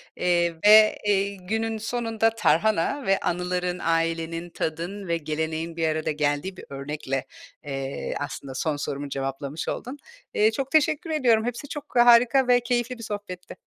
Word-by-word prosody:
eee, 175 -1 +1
ve, 215 0 +8
eee, 200 0 +1
günün 220 +3 -2
sonunda 225 0 0
tarhana 220 - +1
ve 195 0 +3
anıların, 180 0 -2
ailenin, 165 +1 -1
tadın 170 +5 -4
ve 170 0 +1
geleneğin 160 +1 -3
bir 165 -1 0
arada 155 0 -1
geldiği 150 +5 -1
bir - - -10
örnekle, 140 -1 -4 0.4
eee, 135 -1 -4
aslında 140 -2 -6
son 155 +2 -1
sorumu 140 0 -4
cevaplamış 135 +2 -4
oldun. 260 +4 -4 0.4
Eee, 215 +1 +4
çok 270 +4 -4
teşekkür 310 +1 +2
ediyorum. 240 -7 +3
Hepsi 245 +4 -4
çok 295 -2 -8
harika 245 +2 +6
ve 245 0 +5
keyifli 240 0 -1
bir 230 - -9
sohbetti. 205 -4 -7
180 Hz, 150 wpm, -25 LUFS, 160-225 Hz, 0.4 s, ve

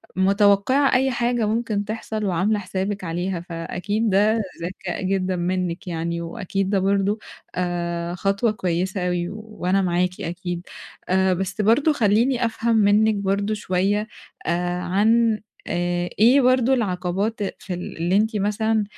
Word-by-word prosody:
متوقَّعة 200 +8 +3
أي 265 +1 +3
حاجة 240 -2 0
ممكن 215 -2 -1
تحصل 215 0 -4
وعاملة 195 +3 +1
حسابِك 195 +1 -3
عليها، 175 +2 -2
فأكيد 180 +6 -2
ده 210 +3 +3 0.2
ذكاء 180 +1 -5
جدًا 185 -1 0
منِّك 180 0 -2
يعني، 170 0 -2
وأكيد 185 +3 -3
ده 195 -1 +2
برضه 200 +2 +1 0.4
آآ 175 -1 -2
خطوة 200 +4 +1
كويسة 185 -1 -1
أوي 175 0 -1
وأنا 210 -3 -2
معاكِ 180 0 0
أكيد. 175 +1 -5 0.4
آآ 190 0 +3
بس 190 +3 -2
برضه 255 +9 +4
خلّيني 235 +1 +2
أفهم 230 0 0
منِّك 215 +1 +4
برضه 200 +1 0
شوية 205 +1 0 0.4
آآ 175 +1 -1
عن 215 +4 +2 0.3
آآ 175 0 -1
إيه 245 +6 +6
برضه 255 0 +3
العقبات 195 -1 -1 0.2
في 185 - -6
ال 180 - -6
اللي 175 +3 +1
أنتِ 220 +2 +1
مثلًا 215 +2 +1
195 Hz, 135 wpm, -23 LUFS, 180-215 Hz, 0.4 s, إيه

